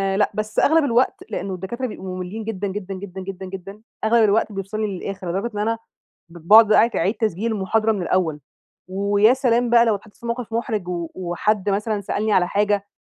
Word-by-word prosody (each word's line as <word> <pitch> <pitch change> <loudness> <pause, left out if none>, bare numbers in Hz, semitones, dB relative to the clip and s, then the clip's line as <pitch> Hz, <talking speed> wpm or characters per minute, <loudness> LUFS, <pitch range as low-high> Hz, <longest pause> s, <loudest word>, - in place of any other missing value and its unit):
لأ. 205 - +2
بس 215 0 -2
أغلب 320 +1 +4
الوقت 250 -1 +1
لأنه 195 -3 -4
الدكاترة 235 +8 -4
بيبقوا 190 -4 -7
مملين 185 +5 -5
جدًا، 205 -2 -3
جدًا، 195 0 -5
جدًا، 190 0 -7
جدًا، 190 0 -7
جدًا. 195 +2 -9 0.2
أغلب 225 +1 +4
الوقت 215 +1 +2
بيفصلني 205 +2 -3
للآخر، 190 -1 -5
لدرجة 200 +6 -2
إن 205 - -2
أنا 225 +2 0 0.5
ب 165 -1 -14
باقعد 220 +3 +9
بقى 215 - +6
أجي 235 - -4
أعيد 190 +5 +1
تسجيل 220 +1 -1
المحاضرة 220 +2 +1
من 205 -4 -2
الأول. 170 -3 0 0.5
ويا 200 +4 +3
سلام 245 -2 +1
بقى 235 0 +6
لو 225 -2 +2
اتحطيت 205 +1 -13
في - - -13
موقف 235 -1 -4
محرج 220 -5 -2
و 170 -2 -3
وحد 190 +3 -1
مثلًا 205 +1 -1
سألني 210 +2 -1
على 180 -2 +3
حاجة 205 0 0
205 Hz, 200 wpm, -22 LUFS, 190-225 Hz, 0.5 s, باقعد